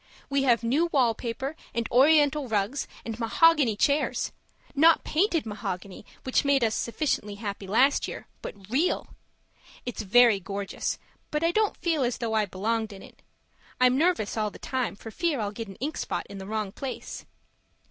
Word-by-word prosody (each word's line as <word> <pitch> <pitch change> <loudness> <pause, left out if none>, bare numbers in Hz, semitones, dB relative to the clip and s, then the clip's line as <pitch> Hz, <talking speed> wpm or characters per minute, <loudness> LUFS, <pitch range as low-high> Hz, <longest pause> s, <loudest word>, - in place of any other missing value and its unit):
We 275 0 +2
have 240 -3 +3
new 280 +9 +2
wall 260 -8 +3
paper 260 +6 -4 0.2
and 235 -1 -1
oriental 290 +2 +4
rugs 215 +5 -1 0.2
and 225 0 -5
mahogany 275 0 +4
chairs 285 +7 +1 0.4
not 320 +3 +5
painted 330 - +1
mahogany 200 -3 -6 0.2
which 260 - +1
made 280 -2 +3
us 220 -1 +2
sufficiently 230 -5 -1
happy 200 -2 -6
last 260 +8 +3
year, - - -7 0.2
but 195 -2 -9
real. 300 +8 +1 0.8
It's 245 -2 -4
very 220 +1 +5
gorgeous, 195 +1 -4 0.3
but 300 +1 -1
I 335 - +3
don't 430 +2 +1
feel 330 -4 0
as 245 -1 0
though 230 -2 -2
I 215 -2 +2
belonged 220 +4 -2
in 195 -1 -10
it; - - -16 0.6
I'm 255 0 +5
nervous 315 - +1
all 215 -1 0
the - - -12
time 255 -5 -2
for 225 +2 -10
fear 320 +1 -1
I'll 205 -2 -2
get 225 +1 -6
an 195 - -10
ink 295 +8 -4
spot - - -3
in 200 -1 -9
the 190 - -8
wrong 215 -2 -2
place. 265 +4 -6
240 Hz, 175 wpm, -27 LUFS, 210-285 Hz, 0.8 s, not